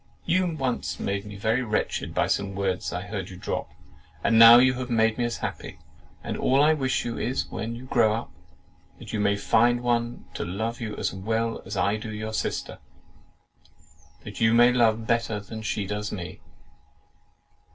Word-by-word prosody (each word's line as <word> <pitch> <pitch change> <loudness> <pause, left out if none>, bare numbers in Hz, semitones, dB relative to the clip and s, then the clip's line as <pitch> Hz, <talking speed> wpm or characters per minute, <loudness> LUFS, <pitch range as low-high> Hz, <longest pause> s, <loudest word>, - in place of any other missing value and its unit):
You 180 -2 +1
once 125 - -2
made 100 +1 -2
me 105 -1 -9
very 110 +5 0
wretched 110 -4 -2
by - - +2
some 100 -1 -1
words 95 -2 -2
I 90 +1 -4
heard 95 -1 -5
you 90 - -10
drop, 90 - -4 0.5
and 115 -1 +4
now 115 +1 +11
you 130 +1 +5
have 125 0 -5
made 115 0 +2
me 120 - +1
as 120 - -3
happy; - - -6 0.5
and - - -4
all 135 +1 +2
I 155 +1 +5
wish 135 -3 -1
you 120 -1 -4
is, 125 +3 -1
when 115 +2 -4
you 120 - -9
grow 115 -4 +3
up, 115 - -6 0.7
that - - -10
you 110 - -1
may 100 0 +2
find 115 +4 +3
some 120 - -9
one 120 0 -1
to - - -4
love 110 +7 -4
you 110 -2 -4
as - - -2
well 115 +4 -2
as 100 +1 -5
I 100 +4 +1
do 110 0 -7
your 110 +1 -5
sister, - - -3
and - - -32 0.4
that - - -8
you 110 +1 +4
may 120 +1 +6
love 115 -2 +2
better 115 -2 0
than 110 +2 -8
she 105 -2 -2
does 105 +1 -4
me!" 90 -4 -6
110 Hz, 195 wpm, -26 LUFS, 105-120 Hz, 0.7 s, now